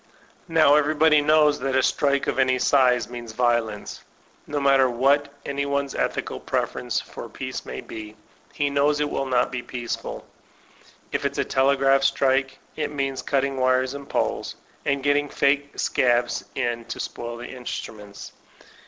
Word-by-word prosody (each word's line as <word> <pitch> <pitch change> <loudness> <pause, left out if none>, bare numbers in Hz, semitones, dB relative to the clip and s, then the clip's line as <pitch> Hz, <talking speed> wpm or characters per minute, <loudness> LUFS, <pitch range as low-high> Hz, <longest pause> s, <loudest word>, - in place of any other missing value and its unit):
Now 160 -4 +5
everybody 150 +1 +4
knows 150 0 +4
that 135 -1 -1
a 130 - +3
strike 140 +1 +1
of - - -1
any 130 -1 +3
size 125 -1 +3
means 120 -2 -8
violence. 120 -3 -1 0.4
No 145 0 -2
matter 135 -2 +4
what 140 +4 +2
any 140 0 -2
one's 140 -1 -1
ethical - - -2
preference - - -2
for - - -9
peace - - -6
may - - -5
be, 110 -1 -9 0.4
he 145 -1 -1
knows 145 +1 +2
it 150 -1 -1
will 135 - -2
not 125 -1 +1
be 125 -1 -3
peaceful. 120 -1 -5 0.9
If - - -2
il*8 - - -2
a - - +1
telegraph 135 0 +3
strike, 135 -1 +1 0.2
it 155 - -2
means 135 -2 -2
cutting 135 -1 0
wires 130 0 +2
and 140 -1 -9
poles, - - -1 0.3
and 140 -1 0
getting 145 0 +2
fake 140 +1 +1
scabs 120 -1 +1
in 120 -1 -2
to - - -6
spoil 120 0 -5
the 120 +1 -8
instruments. 105 -5 -8
135 Hz, 155 wpm, -24 LUFS, 125-140 Hz, 0.9 s, Now